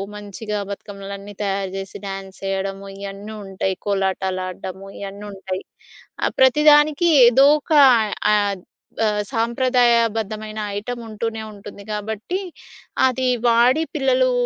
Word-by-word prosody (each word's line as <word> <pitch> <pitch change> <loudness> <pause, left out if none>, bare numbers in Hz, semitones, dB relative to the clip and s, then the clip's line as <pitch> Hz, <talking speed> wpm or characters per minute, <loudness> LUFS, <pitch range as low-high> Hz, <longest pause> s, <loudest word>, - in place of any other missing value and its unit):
మంచిగా 210 +1 -5
బతుకమ్మలన్నీ 200 0 -8
తయారు 195 -1 -2
జేసి 195 0 -7
డ్యాన్స్ 195 0 -7
చేయడము 195 0 -3
ఇయన్నీ 200 +2 -7
ఉంటాయి. 190 0 -2
కోలాటాలు 190 -1 0
ఆడడము 185 +1 -7
ఇయన్నీ 200 +1 -7
ఉంటాయి. 190 -1 -5 0.6
ఆహ్, - - 0
ప్రతిదానికి 300 +4 +5 0.2
ఏదో 265 +4 +6
ఒక 315 - -3 0.6
ఆహ్, 200 -3 0 0.4
ఆహ్, 210 0 0
సాంప్రదాయబద్ధమైన 230 -3 +1 0.2
ఐటమ్ 240 +3 -5
ఉంటూనే 220 +1 -4
ఉంటుంది 200 0 -11
గాబట్టి, 220 - -3 0.7
అది 255 0 -1 0.2
వాడి 245 +7 +4
పిల్లలు 260 -2 +2
210 Hz, 110 wpm, -21 LUFS, 195-235 Hz, 0.7 s, ఏదో